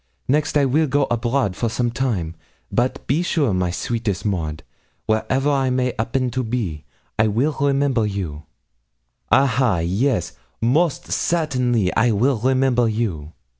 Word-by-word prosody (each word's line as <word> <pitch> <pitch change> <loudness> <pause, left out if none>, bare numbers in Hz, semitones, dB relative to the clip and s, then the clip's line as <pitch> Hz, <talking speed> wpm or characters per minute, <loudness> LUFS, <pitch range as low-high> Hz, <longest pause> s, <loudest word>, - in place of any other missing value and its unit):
next 150 +2 +1
I 140 - +3
will 150 +4 +2
go 140 +1 +2
abroad 120 -3 0
for 115 +3 -1
some 120 +1 -1
time; 115 -10 -2 0.4
but 130 +3 -1
be 145 +6 +1
sure, 150 - +1
my 90 -1 0
sweetest 110 +1 -2
Maud, 80 -6 -2 0.4
wherever 130 +6 +1
I 135 -2 +1
may 125 0 0
'appen 125 +3 0
to 130 +2 -1
be, 110 -11 -3 0.3
I 110 - +4
will 125 +9 0
remember 140 -5 +2
you 80 -8 -5 0.8
ah, 135 - +6
ha! 125 -5 +2
Yes; 95 - 0 0.3
most 145 +6 +1
certainly, 125 - +1
I 120 +2 +3
will 120 +4 +2
remember 130 -1 +2
you. 95 -9 -3
120 Hz, 145 wpm, -21 LUFS, 105-135 Hz, 0.8 s, ah